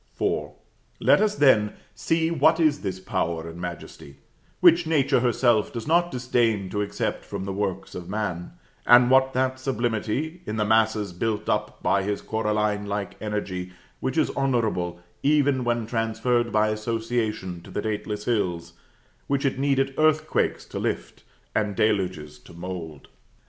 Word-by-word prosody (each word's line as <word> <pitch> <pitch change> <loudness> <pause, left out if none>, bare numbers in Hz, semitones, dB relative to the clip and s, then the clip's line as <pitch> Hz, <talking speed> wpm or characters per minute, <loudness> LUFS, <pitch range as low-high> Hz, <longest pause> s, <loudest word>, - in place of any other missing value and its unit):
IV. - - 0 0.5
Let - - +4
us, 210 -1 +2
then, 110 - +4 0.2
see 160 +9 0
what 160 +1 +4
is 155 -3 +3
this 95 -2 -4
power 85 -3 -2
and 85 +1 -8
majesty, 85 -5 -8 0.4
which 170 -1 +5
Nature 145 -6 +3
herself 120 -2 +2
does 115 -2 -5
not 175 +2 +3
disdain 120 - 0
to 105 - -1
accept 100 - -2
from - - -5
the 100 - -3
works 95 -1 -3
of 90 -1 -7
man; 100 - -3 0.3
and 120 +1 +7
what 130 0 +4
that 130 0 0
sublimity 130 +6 -2
in 105 - -3
the 105 -1 0
masses 110 -2 +2
built 105 +3 -2
up 105 0 -2
by 100 - +2
his 100 +1 -3
coralline 105 -1 -1
like 100 -1 -3
energy, 95 -4 -4 0.3
which 130 +4 -2
is 155 - +2
honorable, 110 -10 0 0.2
even 145 -3 +3
when 120 -1 0
transferred 115 +1 0
by 110 0 +3
association 110 -4 -2
to - - -14
the - - -3
dateless 105 -1 -3
hills, 85 -7 -1 0.5
which 140 +1 0
it 135 -1 0
needed 135 -1 +1
earthquakes 155 0 +2
to - - -6
lift, - - -3 0.3
and 105 -2 0
deluges 90 -9 0
to 75 - -16
mould. 85 -4 -7
110 Hz, 155 wpm, -25 LUFS, 100-130 Hz, 0.5 s, and